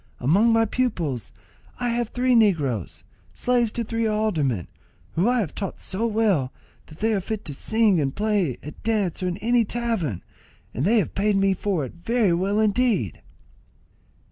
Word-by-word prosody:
Among 195 - +4
my 225 0 +4
pupils 175 - -2 0.5
I 245 -1 0
have 235 -1 -1
three 250 +1 +1
negroes, 150 - +1 0.3
slaves 245 -3 +1
to 235 - -2
three 230 0 -1
aldermen, 160 - 0 0.4
whom 180 +6 +1
I 245 -1 +3
have 180 - -4
taught 195 -3 -5
so 215 +5 -2
well 205 - +1 0.4
that 155 +4 -15
they 220 +1 +2
are 200 - 0
fit 215 +3 -5
to 150 - -5
sing 215 +2 +2
and 135 -2 -2
play 205 - 0
at 150 - -10
dance 210 -6 -1
or 185 - 0
in 180 0 -2
any 235 +3 +2
tavern, 220 - -2 0.5
and 135 - -1
they 225 +5 +4
have 200 - 0
paid 205 +1 +1
me 195 0 +3
for 185 -5 -1
it 125 - -9
very 230 -5 +2
well 195 +5 +1
indeed." 215 - +1
205 Hz, 170 wpm, -24 LUFS, 165-225 Hz, 0.5 s, Among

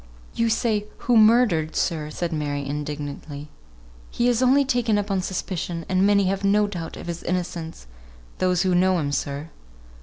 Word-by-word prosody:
"You 230 0 +1
say 220 -2 0
'who 245 - +1
murdered,' 215 -8 +4
sir!" 155 -4 -1
said 170 +2 -3
Mary, 145 -2 -2
indignantly. 145 0 -5 0.6
"He 240 - 0
is 245 -1 +2
only 270 +2 +4
taken 245 -5 +1
up 205 0 -2
on 190 -1 +1
suspicion, 175 -3 -4
and 185 +1 +2
many 200 -1 +4
have 195 +1 -1
no 205 +1 +3
doubt 175 -5 -6
of - - -8
his 170 0 -5
innocence 170 - -4 0.5
those 180 -1 +2
who 185 -1 +1
know 185 +1 +3
him, 145 -4 -1
sir." 145 +2 -3
180 Hz, 170 wpm, -24 LUFS, 155-210 Hz, 0.6 s, murdered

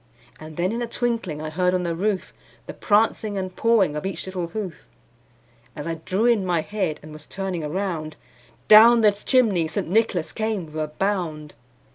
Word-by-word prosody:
And 155 0 -11
then 180 +3 0
in 235 +2 -3
a 240 - -2
twinkling 230 -11 -2
I 155 - -5
heard 180 +2 +1
on 180 - -1
the 170 -1 -1
roof, 195 +2 -2 0.3
The - - -7
prancing 215 -1 +1
and 185 -1 -4
pawing 220 -9 +2
of 150 - -4
each 195 - -4
little 185 -2 -4
hoof. 180 - -6 0.9
As 145 - -6
I 165 - -2
drew 195 +5 0
in 235 -5 +3
my 175 -3 +1
head, 185 -4 -3
and 155 0 -11
was 155 -1 -12
turning 190 -4 -4
around, 155 -1 -3 0.5
Down 230 +2 +8
the 210 -1 +6
chimney 205 -5 +2
St. 155 - -3
Nicholas 190 -3 +1
came 215 -5 -2
with 155 0 -10
a - - -3
bound. 155 -3 -3
185 Hz, 185 wpm, -23 LUFS, 160-215 Hz, 0.9 s, Down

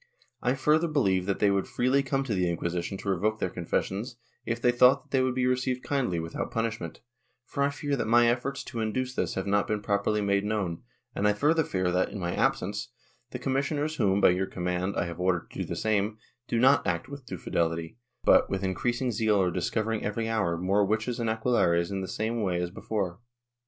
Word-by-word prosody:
I 125 +2 +1
further 155 +5 +3
believe 95 - +1
that 100 - 0
they 100 - +3
would 100 -1 0
freely 130 +3 +2
come 135 0 -1
to 125 -5 -2
the 90 -2 +1
Inquisition 85 +2 -2
to 100 - -5
revoke 105 +3 +1
their 95 - -2
confessions, 95 +6 -2 0.3
if 115 0 -1
they 120 +1 +3
thought 125 +1 +5
that - - -31
they 130 - +3
would 130 -1 0
be 130 -1 +1
received 125 0 0
kindly 125 -12 0
without 80 0 -4
punishment, 115 -8 -3 0.4
for 140 - -4
I 140 - +3
fear 145 0 -2
that 130 - -2
my 120 +1 +5
efforts 130 +3 -1
to 125 -3 -6
induce 125 +4 -1
this - - -2
have 95 - -2
not 100 0 +1
been 105 -1 -2
properly 100 +1 +1
made 100 -1 +1
known, 105 -6 -2 0.3
and 105 - +1
I 105 - +4
further 155 +9 +2
fear 95 -8 -1
that, 90 +1 +1
in - - -7
my 85 -2 -2
absence, 60 - 0 0.4
the - - -5
commissioners 145 +3 -1
whom, 100 -4 +2
by - - +6
your 95 +2 0
command, 90 +2 -2
I - - +1
have 85 0 -6
ordered 90 -1 0
to - - -8
do - - -1
the - - -4
same, 105 0 0 0.3
do 120 - 0
not 130 0 +4
act 85 +5 -1
with 140 -2 -10
due - - -5
fidelity, 85 +5 -2 0.2
but, - - +5
with 95 0 -2
increasing 120 +7 -1
zeal 110 -1 +2
are 90 -2 +2
discovering 110 +5 -1
every 110 +2 -2
hour 100 -7 0
more 95 +4 +2
witches 110 +4 -1
and 115 -1 0
aquelarres, 105 -7 +2
in 95 -1 -2
the 95 - -4
same 110 +3 -2
way 90 -4 0
as 90 0 -2
before. 95 -2 -3
105 Hz, 220 wpm, -28 LUFS, 95-125 Hz, 0.4 s, by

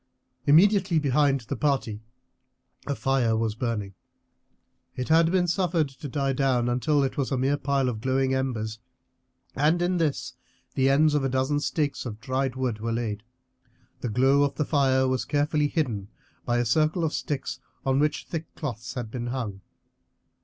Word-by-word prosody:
Immediately 185 +3 +5
behind 140 -1 +2
the 115 - -5
party 135 -8 -1 0.9
a 140 - -1
fire 125 -5 +1
was 110 -1 0
burning; 110 -4 -3 1.0
it 125 +2 -4
had 165 +1 +5
been 180 -1 +3
suffered 170 -4 +1
to 135 +2 -9
die 135 0 0
down 130 -3 +1
until 140 +4 +2
it 135 - -2
was 140 -1 -1
a 135 - +1
mere 135 +3 +2
pile 140 -2 0
of 110 -4 -3
glowing 130 +1 +1
embers, 110 -5 -2 0.8
and 155 +5 +3
in 175 +1 +1
this 155 -4 -1 0.4
the 135 0 +2
ends 150 +2 +4
of 145 -2 +1
a 135 - +1
dozen 130 +3 +1
stakes 145 -1 -1
of 105 -2 -7
dried 130 +2 -1
wood 125 -4 -2
were 115 +2 -2
laid. 115 -3 -2 0.8
The 120 - -3
glow 135 +5 +3
of 145 -1 +1
the 150 - 0
fire 130 -3 +2
was 130 0 0
carefully 150 0 +1
hidden 120 - -2 0.4
by 120 0 +1
a 120 - +1
circle 155 - +2
of 160 - 0
sticks 145 -4 -3 0.3
on 135 0 +2
which 150 0 0
thick 165 -1 -5
cloths 120 -6 -5
had 120 -4 -5
been 120 -1 -4
hung. 115 -6 -4
135 Hz, 170 wpm, -26 LUFS, 120-150 Hz, 1.0 s, Immediately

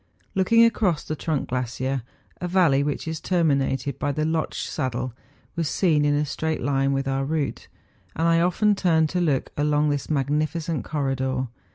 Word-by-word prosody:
Looking 230 +5 +5
across 200 -8 +1
the 155 - -4
trunk 155 -2 -2
glacier, 130 +1 -2 0.4
a 180 - -4
valley 170 -7 +3
which 145 +2 -2
is 160 -1 -4
terminated 140 -6 0
by 145 - 0
the 155 +2 -1
Lotsch 160 0 -1
saddle, 130 -3 -3 0.4
was 165 -3 -1
seen 155 -6 +2
in 145 0 +3
a 150 +1 +1
straight 160 +1 -2
line 135 0 +1
with 135 0 -1
our 135 0 0
route; 150 0 -2 0.5
and 165 +2 +1
I 165 0 +4
often 205 +4 +3
turned 165 -5 +2
to 180 +2 -1
look 150 -6 0
along 150 0 +2
this 145 -1 -3
magnificent 155 +1 -1
corridor. 130 -3 -1
150 Hz, 170 wpm, -24 LUFS, 135-165 Hz, 0.5 s, Looking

